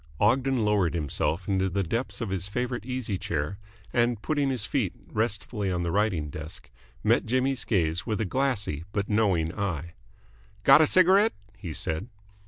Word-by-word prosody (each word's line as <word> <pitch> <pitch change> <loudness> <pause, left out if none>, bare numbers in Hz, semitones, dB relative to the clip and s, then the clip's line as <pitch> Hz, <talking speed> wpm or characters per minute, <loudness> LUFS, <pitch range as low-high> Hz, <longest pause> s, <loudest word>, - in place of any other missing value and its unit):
Ogden 125 +2 +2
lowered 100 -6 +2
himself 80 +3 -1
into 95 -1 +1
the 100 +2 0
depths 115 +9 -3
of 110 -4 -3
his 95 -1 -1
favourite 120 +2 -3
easy 125 -7 -2
chair, 80 +5 -3 0.3
and, 120 -2 +2
putting 145 +3 0
his 125 -6 -1
feet - - -1 0.2
restfully 105 -2 -1
on 90 -1 -1
the 85 - -1
writing 95 -8 0
desk, 80 +2 -9 0.3
met - - +3
Jimmy's 130 0 +1
gaze 85 -5 +1
with 110 -2 -2
a 110 - 0
glassy 105 - -1
but 100 -1 -1
knowing 95 -7 +2
eye. 85 -5 -3 0.7
"Got 135 +5 +8
a 155 - +5
cigarette?" 190 +6 +5 0.2
he 95 -4 -7
said. 80 +5 -2
105 Hz, 165 wpm, -27 LUFS, 90-125 Hz, 0.7 s, Got